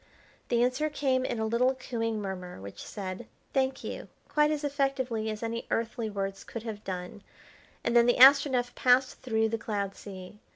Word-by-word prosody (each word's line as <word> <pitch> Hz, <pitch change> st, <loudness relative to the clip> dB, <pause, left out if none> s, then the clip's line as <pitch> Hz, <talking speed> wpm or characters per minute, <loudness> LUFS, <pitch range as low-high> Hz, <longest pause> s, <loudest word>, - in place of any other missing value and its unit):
The 235 Hz, 0 st, +3 dB
answer 255 Hz, +5 st, +1 dB
came 265 Hz, -3 st, +1 dB
in 240 Hz, -, -2 dB
a 220 Hz, -, 0 dB
little 245 Hz, +4 st, +2 dB
cooing 230 Hz, -4 st, -2 dB
murmur, 185 Hz, -, -6 dB
which 100 Hz, +1 st, -9 dB
said, 190 Hz, +2 st, -6 dB, 0.3 s
"Thank 265 Hz, 0 st, 0 dB
you!" -, -, -6 dB, 0.2 s
quite 300 Hz, 0 st, +3 dB
as 300 Hz, -1 st, -1 dB
effectively 270 Hz, -6 st, -1 dB
as 215 Hz, +1 st, -5 dB
any 230 Hz, +1 st, -3 dB
earthly 230 Hz, 0 st, -1 dB
words 195 Hz, -1 st, -4 dB
could 230 Hz, -, -7 dB
have 215 Hz, -3 st, -6 dB
done, 185 Hz, +2 st, -6 dB, 0.6 s
and 235 Hz, -, 0 dB
then 235 Hz, 0 st, +6 dB
the 245 Hz, -, +4 dB
Astronef 260 Hz, -2 st, +6 dB
passed 255 Hz, +1 st, +3 dB
through 220 Hz, -3 st, +1 dB
the 225 Hz, 0 st, -2 dB
cloud 200 Hz, -2 st, -2 dB
sea. 195 Hz, 0 st, -10 dB
230 Hz, 175 wpm, -29 LUFS, 210-260 Hz, 0.6 s, then